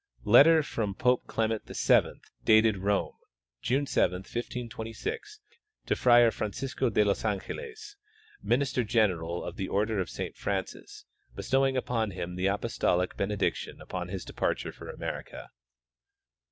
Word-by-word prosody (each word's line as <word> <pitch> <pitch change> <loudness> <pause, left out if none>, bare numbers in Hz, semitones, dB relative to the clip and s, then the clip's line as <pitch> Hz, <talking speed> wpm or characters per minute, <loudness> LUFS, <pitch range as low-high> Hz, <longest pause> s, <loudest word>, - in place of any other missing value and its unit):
Letter 155 +8 +7
from 105 -7 -3
Pope 125 +2 +1
Clement 110 -1 -1
VII, - - +2 0.2
dated 110 -1 +5
Rome, 100 +1 0 0.5
June 135 +3 +1
7, 90 -9 +1
1526, 120 - -6 0.4
to - - +1
Friar 120 -2 +6
Francisco 130 +5 -2
de 105 -1 +3
los 100 - 0
Angeles, 425 - -5 0.4
minister 130 0 +1
general 95 -7 0
of - - -7
the 95 - -3
order 105 +1 0
of 95 - -2
Saint - - -5
Francis, - - -5 0.3
bestowing 135 0 +1
upon 115 -4 -1
him 90 -2 -5
the 90 +1 0
apostolic 95 -3 0
bene 100 +1 -1
diction - - -2
upon 90 -1 -5
his 95 0 -5
departure - - -2
for - - -11
America. - - -6
110 Hz, 130 wpm, -29 LUFS, 100-130 Hz, 0.5 s, Letter